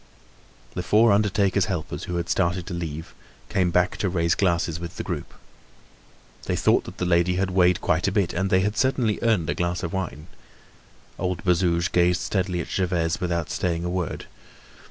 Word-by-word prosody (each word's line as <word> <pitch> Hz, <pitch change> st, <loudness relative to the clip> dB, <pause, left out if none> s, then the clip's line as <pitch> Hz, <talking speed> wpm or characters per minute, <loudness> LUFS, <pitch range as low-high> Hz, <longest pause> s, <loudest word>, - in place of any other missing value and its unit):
The -, -, -3 dB
four 110 Hz, +5 st, +4 dB
undertaker's 100 Hz, -2 st, +2 dB
helpers, 85 Hz, -6 st, -4 dB
who 90 Hz, -, -4 dB
had 85 Hz, 0 st, -2 dB
started 90 Hz, 0 st, 0 dB
to 95 Hz, -, -6 dB
leave, 80 Hz, -2 st, -5 dB, 0.4 s
came 95 Hz, -3 st, +1 dB
back 90 Hz, +1 st, +1 dB
to 95 Hz, -, 0 dB
raise 85 Hz, -2 st, +1 dB
glasses 85 Hz, -3 st, 0 dB
with 85 Hz, -1 st, -7 dB
the -, -, -3 dB
group. -, -, -5 dB, 1.1 s
They -, -, 0 dB
thought -, -, +2 dB
that -, -, -10 dB
the 90 Hz, -, -1 dB
lady 90 Hz, +1 st, +2 dB
had 95 Hz, +1 st, 0 dB
weighed 90 Hz, -1 st, +3 dB
quite 90 Hz, +1 st, +1 dB
a -, -, +1 dB
bit 95 Hz, -3 st, 0 dB
and 95 Hz, +2 st, -1 dB
they 95 Hz, 0 st, +4 dB
had 105 Hz, +2 st, 0 dB
certainly 125 Hz, -5 st, +1 dB
earned 110 Hz, -8 st, +2 dB
a -, -, 0 dB
glass 85 Hz, 0 st, -2 dB
of 85 Hz, -, -3 dB
wine. 85 Hz, -5 st, -4 dB, 0.9 s
Old 90 Hz, -2 st, -2 dB
Bazouge 85 Hz, -1 st, +2 dB
gazed 90 Hz, 0 st, +3 dB
steadily 90 Hz, -3 st, -1 dB
at -, -, -6 dB
Gervaise 85 Hz, -3 st, 0 dB
without 85 Hz, -3 st, -1 dB
saying 85 Hz, -2 st, -1 dB
a 90 Hz, -, -2 dB
word. 90 Hz, -4 st, -3 dB
90 Hz, 185 wpm, -24 LUFS, 85-95 Hz, 1.1 s, four